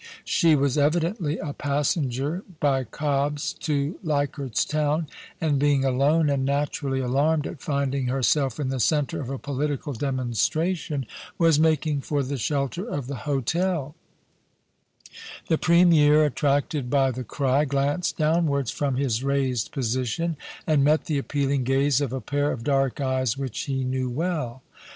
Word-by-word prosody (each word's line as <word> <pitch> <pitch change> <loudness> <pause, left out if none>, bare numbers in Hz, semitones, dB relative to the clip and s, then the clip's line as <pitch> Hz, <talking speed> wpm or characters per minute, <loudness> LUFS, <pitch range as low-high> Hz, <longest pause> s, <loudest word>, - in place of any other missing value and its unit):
She 165 -2 +4
was 140 0 +1
evidently 160 +2 +1
a 145 - -5
passenger 145 - -1 0.2
by 135 -3 +1
Cobb's 145 +1 -1
to 145 +1 -2
Leichardt's 145 - -1
Town, 150 +1 0 0.3
and 150 -4 +1
being 140 -1 +2
alone, 140 +5 +3
and 140 -2 +1
naturally 140 -1 -1
alarmed 145 +4 +1
at - - -7
finding 140 -2 -1
herself 135 0 +1
in 140 -3 -1
the 135 -1 -2
centre 150 +5 +1
of 130 - -6
a 135 - -3
political 145 +1 -3
demon 130 0 -2
stration, 155 - 0 0.3
was 165 -3 +4
making 155 -2 +2
for 145 0 -1
the 135 +2 -3
shelter 140 - -1
of 145 - -4
the 135 0 -6
hotel 150 +2 0 1.6
The 160 - +2
Premier, 160 -3 +5
attracted 145 -1 0
by 135 -1 +3
the 130 +1 -5
cry, 135 +4 +1
glanced 140 +5 0
downwards 155 -5 +1
from 140 -3 -1
his 125 -3 0
raised 135 -4 0
position, 130 +7 -1 0.3
and 150 -3 +3
met 155 +2 +3
the 150 -3 0
appealing 140 -1 -1
gaze 135 +2 +2
of 140 -4 -1
a 130 0 -3
pair 145 +6 0
of 115 - -5
dark 135 0 +1
eyes 130 -3 0
which 135 -4 -4
he 135 -2 -2
knew 130 0 -1
well. 140 -3 -3
140 Hz, 150 wpm, -25 LUFS, 135-150 Hz, 1.6 s, Premier